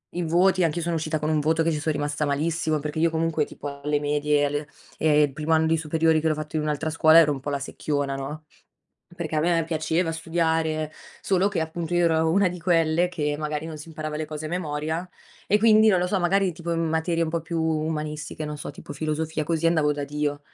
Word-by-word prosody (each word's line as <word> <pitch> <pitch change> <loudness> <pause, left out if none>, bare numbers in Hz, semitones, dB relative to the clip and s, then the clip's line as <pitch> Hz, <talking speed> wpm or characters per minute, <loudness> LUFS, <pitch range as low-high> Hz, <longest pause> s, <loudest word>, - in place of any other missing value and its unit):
I 175 - -1
voti 180 +3 +3
anch'io 165 +1 0
sono 170 0 -1
uscita 155 0 -1
con 150 +1 -1
un 155 -1 +2
voto 160 +2 +2
che 165 - +1
ci 150 - -2
son 155 +1 -1
rimasta 145 +1 -1
malissimo, 155 +2 0
perché 150 +2 -4
io 165 +1 +3
comunque 160 -1 0
tipo 140 -1 -8
alle 150 0 0
medie 150 0 +1
e 145 - +3
alle 145 +1 -2 0.3
e 150 -1 +4
il 140 -2 0
primo 155 +2 -3
anno 160 0 +3
di 165 - +3
superiori 160 0 +2
che 160 - 0
l'ho 155 - +2
fatto 155 0 -6
in - - 0
un'altra 150 +1 -1
scuola, 160 0 +6
ero 155 -3 +5
un 135 - -7
po' 145 - -4
la 140 - -1
secchiona 140 0 -2
no. 150 +3 -6 0.7
Perché 160 -2 -3
a - - +3
me 170 +1 +2
piaceva 160 +1 0
studiare, 160 -1 0 0.3
solo 190 +1 +2
che, 195 -5 -2
appunto, 160 +1 -4
io 175 0 +3
ero 160 -1 +2
una 195 +2 +3
di 180 0 -7
quelle 165 0 +2
che 150 -4 -2
magari 150 0 -3
non 160 -1 -7
si 150 - -10
imparava 155 -1 -5
le 155 - -2
cose 155 0 -6
a - - -5
memoria 160 0 -3 0.4
e, 210 - +3
quindi, 220 0 +6
non 185 -4 +4
lo 180 - +1
so, 195 - +1
magari 190 +2 +2
tipo 170 0 -4
in 165 - 0
materie 165 +1 0
un 165 - 0
po' 165 0 -2
più 165 0 -3
umanistiche, 155 -1 -2
non 150 - -5
so - - -6
tipo - - -10
filosofia 155 +1 -2
così, 165 +1 0
andavo 155 -3 +3
da 145 -1 -3
Dio, 145 0 -2
160 Hz, 240 wpm, -25 LUFS, 150-165 Hz, 0.7 s, scuola